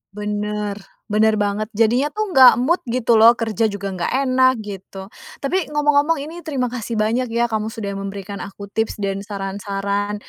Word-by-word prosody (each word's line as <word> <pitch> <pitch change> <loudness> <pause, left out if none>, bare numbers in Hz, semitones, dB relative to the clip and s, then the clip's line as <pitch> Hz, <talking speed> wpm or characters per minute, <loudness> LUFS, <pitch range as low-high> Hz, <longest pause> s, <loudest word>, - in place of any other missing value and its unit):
Bener, 210 0 -3 0.3
bener 215 +1 +3
banget, 205 +1 -1
jadinya 230 +6 +3
tuh 425 -2 -2
nggak 260 -5 +8
mood 340 +7 +2
gitu 235 -1 +2
loh, 230 +2 +8
kerja 225 -1 0
juga 200 -1 -4
nggak 180 -2 -3
enak 255 0 +4
gitu. 195 -1 -9 0.3
Tapi 350 +5 0
ngomong-ngomong 295 +1 +2
ini 325 +3 -8
terima 255 -5 -1
kasih 235 -2 -4
banyak 225 +4 0
ya 235 +1 0
kamu 215 0 -1
sudah 220 -2 -5
memberikan 195 0 -6
aku 200 0 -9
tips 220 0 -1
dan 195 0 -1
saran-saran, 200 0 -3
215 Hz, 165 wpm, -20 LUFS, 200-250 Hz, 0.3 s, nggak